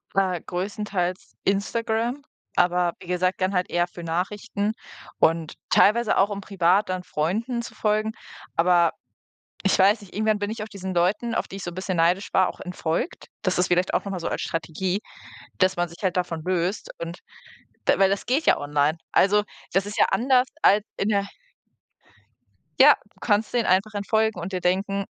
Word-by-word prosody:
Äh, 185 Hz, -2 st, +2 dB
größtenteils 185 Hz, -1 st, -3 dB
Instagram, 230 Hz, +6 st, -1 dB, 0.3 s
aber 175 Hz, -1 st, +2 dB
wie -, -, -13 dB
gesagt, 180 Hz, +1 st, 0 dB
dann 185 Hz, +1 st, +1 dB
halt 180 Hz, -1 st, 0 dB
eher 175 Hz, 0 st, +2 dB
für 175 Hz, -1 st, -10 dB
Nachrichten 200 Hz, +5 st, -2 dB, 0.5 s
und 165 Hz, -1 st, +2 dB
teilweise 225 Hz, +2 st, +4 dB
auch, 195 Hz, -, +4 dB
um 205 Hz, -1 st, -4 dB
privat 195 Hz, +1 st, +2 dB
dann 185 Hz, -1 st, -2 dB
Freunden 215 Hz, +10 st, -1 dB
zu 235 Hz, -, -9 dB
folgen. 215 Hz, +1 st, 0 dB, 0.4 s
Aber 170 Hz, 0 st, +4 dB, 0.7 s
ich 195 Hz, -, +2 dB
weiß 205 Hz, +3 st, +4 dB
nicht, 195 Hz, -, -14 dB
irgendwann 215 Hz, 0 st, +1 dB
bin 205 Hz, 0 st, -2 dB
ich 220 Hz, -1 st, -5 dB
auf 215 Hz, -, -6 dB
diesen 190 Hz, -2 st, -6 dB
Leuten, 210 Hz, +7 st, +1 dB
auf -, -, -1 dB
die 195 Hz, -, -8 dB
ich 195 Hz, -, -7 dB
so 175 Hz, -, -4 dB
bisschen 185 Hz, +1 st, -3 dB
neidisch 175 Hz, +4 st, +2 dB
war, 185 Hz, -1 st, +4 dB
auch -, -, -13 dB
entfolgt. 180 Hz, -, -3 dB
Das -, -, 0 dB
ist 180 Hz, -, +2 dB
vielleicht 180 Hz, +1 st, +1 dB
auch -, -, +1 dB
noch 200 Hz, -, -4 dB
mal 185 Hz, -, -4 dB
so -, -, -2 dB
als -, -, -3 dB
Strategie, 165 Hz, +4 st, -2 dB, 0.6 s
dass 185 Hz, 0 st, +3 dB
man 175 Hz, 0 st, 0 dB
sich 170 Hz, 0 st, -14 dB
halt 185 Hz, -2 st, 0 dB
davon 175 Hz, -3 st, -2 dB
löst 185 Hz, +2 st, -1 dB
und 170 Hz, +1 st, -6 dB, 0.7 s
d -, -, +4 dB
weil 195 Hz, -, +5 dB
das 195 Hz, +1 st, -1 dB
geht 265 Hz, +7 st, 0 dB
ja -, -, +6 dB
online. 145 Hz, +2 st, +1 dB, 0.2 s
Also, 210 Hz, +2 st, +4 dB, 0.3 s
das 195 Hz, +1 st, +3 dB
ist 205 Hz, 0 st, -6 dB
ja -, -, +6 dB
anders 255 Hz, +1 st, +3 dB, 0.2 s
als 205 Hz, +1 st, +5 dB
in 205 Hz, -, 0 dB
der 200 Hz, -1 st, +1 dB, 1.5 s
Ja, -, -, +9 dB, 0.2 s
du -, -, -36 dB
kannst 210 Hz, -1 st, +1 dB
denen 240 Hz, -2 st, +1 dB
einfach 195 Hz, +4 st, +2 dB
entfolgen 220 Hz, 0 st, 0 dB
und 175 Hz, +3 st, -5 dB
dir 185 Hz, -2 st, -3 dB
denken: 195 Hz, +2 st, 0 dB
190 Hz, 185 wpm, -24 LUFS, 180-210 Hz, 1.5 s, Ja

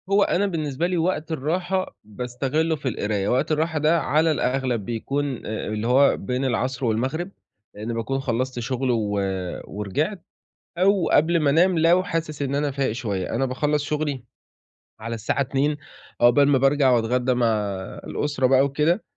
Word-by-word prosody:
هو 200 Hz, +1 st, +4 dB
أنا 200 Hz, +1 st, +1 dB
بالنسبة 155 Hz, -3 st, -2 dB
لي 180 Hz, 0 st, -1 dB
وقت 165 Hz, -1 st, -1 dB
الراحة 175 Hz, +6 st, -2 dB
باستغلّه 125 Hz, +9 st, -2 dB
في 140 Hz, -, -6 dB
القراية، 105 Hz, -4 st, -1 dB
وقت 125 Hz, +5 st, +1 dB
الراحة 160 Hz, +1 st, 0 dB
ده 155 Hz, +3 st, +3 dB
على 155 Hz, +4 st, +2 dB
الأغلب 125 Hz, -6 st, -1 dB
بيكون 135 Hz, +4 st, -3 dB
آآ 110 Hz, -, -4 dB
اللي 110 Hz, +1 st, -2 dB
هو 135 Hz, +3 st, +4 dB
بين 125 Hz, +1 st, -2 dB
العصر 130 Hz, +1 st, -1 dB
والمغرب، 130 Hz, -, -1 dB, 0.5 s
لإنّي 110 Hz, +3 st, -4 dB
باكون 115 Hz, +4 st, -2 dB
خلّصت 130 Hz, -1 st, -2 dB
شغل 130 Hz, +2 st, -1 dB
و 110 Hz, -3 st, 0 dB, 0.6 s
ورِجِعت، 145 Hz, -, -3 dB, 0.6 s
أو 190 Hz, 0 st, +3 dB
قبل 165 Hz, +3 st, +3 dB
ما 150 Hz, -3 st, +2 dB
انام 170 Hz, +4 st, +3 dB
لو 170 Hz, +3 st, +4 dB
حاسس 165 Hz, -4 st, -3 dB
إن 140 Hz, 0 st, -1 dB
أنا 145 Hz, 0 st, 0 dB
فايق 135 Hz, -2 st, -1 dB
شوية، 105 Hz, -5 st, -3 dB
أنا 135 Hz, +3 st, +1 dB
باخلّص 145 Hz, +3 st, 0 dB
شغلي 145 Hz, -4 st, -2 dB, 0.8 s
على 115 Hz, +1 st, -4 dB
الساعة 115 Hz, +5 st, -1 dB
14:00 140 Hz, +2 st, 0 dB, 0.4 s
عقبال 130 Hz, +4 st, +5 dB
ما 145 Hz, -1 st, +4 dB
بارجع 135 Hz, 0 st, +3 dB
واتغدّى 125 Hz, +2 st, +2 dB
مع 120 Hz, -1 st, +2 dB, 0.6 s
الأسرة 145 Hz, -3 st, -1 dB
بقى 135 Hz, +1 st, +4 dB
وكده، 150 Hz, +8 st, +1 dB
135 Hz, 160 wpm, -23 LUFS, 125-155 Hz, 0.8 s, عقبال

